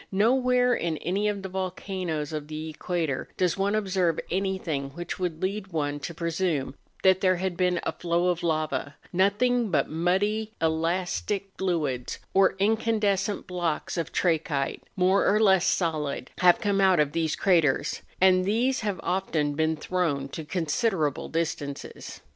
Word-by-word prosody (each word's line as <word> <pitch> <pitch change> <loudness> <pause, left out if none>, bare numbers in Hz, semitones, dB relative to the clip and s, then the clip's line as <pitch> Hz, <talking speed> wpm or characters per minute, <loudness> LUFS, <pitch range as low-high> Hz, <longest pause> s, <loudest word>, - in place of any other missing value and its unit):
Nowhere 250 +4 +3
in 165 -8 -1
any 195 +6 -1
of 200 -2 -2
the - - -3
volcanoes 180 -4 -3
of 150 -1 -4
the 155 +1 -5
equator 160 -4 -2
does 180 -2 +2
one 200 +2 0
observe 185 -5 +1
anything 185 -7 -1
which 175 +1 -5
would 175 -3 -3
lead 195 +1 -2
one 145 -5 -2
to 170 +3 -6
pre¬ 170 0 -2
sume 160 -7 -1 0.3
that 190 0 +5
there 185 -1 +4
had 185 0 -2
been 180 -1 +1
a - - -1
flow 175 +1 0
of 175 -1 -1
lava; 155 -4 -1 0.2
nothing 220 +5 +2
but 150 -6 +1
muddy, 205 +7 0
elastic 175 +5 -1
fluids, 150 -10 -1 0.2
or 190 -1 +4
incandescent 210 -1 +1
blocks 175 -4 -2
of 170 -2 -3
trachyte, 155 -5 0
more 190 +1 +3
or 210 - +4
less 190 -4 +4
solid, 155 -7 -1
have 180 -1 +6
come 200 -1 +1
out 190 -3 +5
of 150 -1 +2
these 160 0 0
craters, 165 -8 +2 0.2
and 185 0 +5
these 235 +7 +1
have 205 -4 -2
often 165 -6 0
been 160 +2 +1
thrown 150 -4 -1
to 160 - -6
con¬ 165 +2 -2
siderable 155 - 0
distances. 155 -4 -4
180 Hz, 155 wpm, -27 LUFS, 160-195 Hz, 0.3 s, have